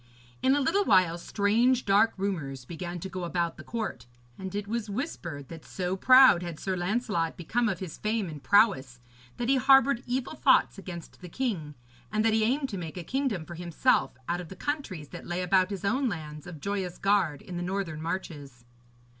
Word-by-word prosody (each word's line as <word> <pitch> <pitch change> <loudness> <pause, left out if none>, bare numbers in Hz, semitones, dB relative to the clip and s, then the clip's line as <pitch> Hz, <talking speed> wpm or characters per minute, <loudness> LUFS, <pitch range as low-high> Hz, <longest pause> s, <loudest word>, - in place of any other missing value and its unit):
In 265 +1 +4
a 290 - +1
little 395 +10 +2
while 175 - +3
strange 230 +7 +2
dark 205 +3 +4
rumours 150 -10 -3
began 175 +3 -6
to 190 - -4
go 185 -1 -6
about 170 -1 -1
the - - -10
court, 220 - -5 0.3
and 190 0 -7
it 205 0 -3
was 225 0 -3
whispered 175 - -5
that 165 -2 -9
so 180 0 -3
proud 255 -3 +7
had 170 -3 -6
Sir 190 -1 -2
Lancelot 180 -2 -1
become 230 +7 0
of 190 - -2
his 175 -4 -7
fame 215 -2 -1
and 150 -3 -8
prowess, 160 - +3 0.4
that 240 - -2
he 270 +1 +4
harboured 270 -1 +5
evil 250 +3 -2
thoughts 260 -8 +3
against 175 -3 -9
the 180 - -9
king, 175 - -3 0.4
and 215 +1 +1
that 225 - +3
he 220 0 +3
aimed 270 +4 +1
to 200 -5 -4
make 165 0 -7
a 175 - -5
kingdom 255 - -2
for 170 - -9
himself 165 -6 +1
out 175 +1 -1
of 175 - -10
the 190 - -9
countries 200 - -4
that - - -9
lay 175 +1 -2
about 185 +1 +3
his 200 -1 -5
own 255 +5 +1
lands 150 -3 -7
of 170 -4 -8
Joyous 190 -1 -3
Gard 195 -8 +1
in 180 -2 -7
the - - -3
northern 175 -4 -3
marches. 145 -8 -6
190 Hz, 200 wpm, -28 LUFS, 170-225 Hz, 0.4 s, proud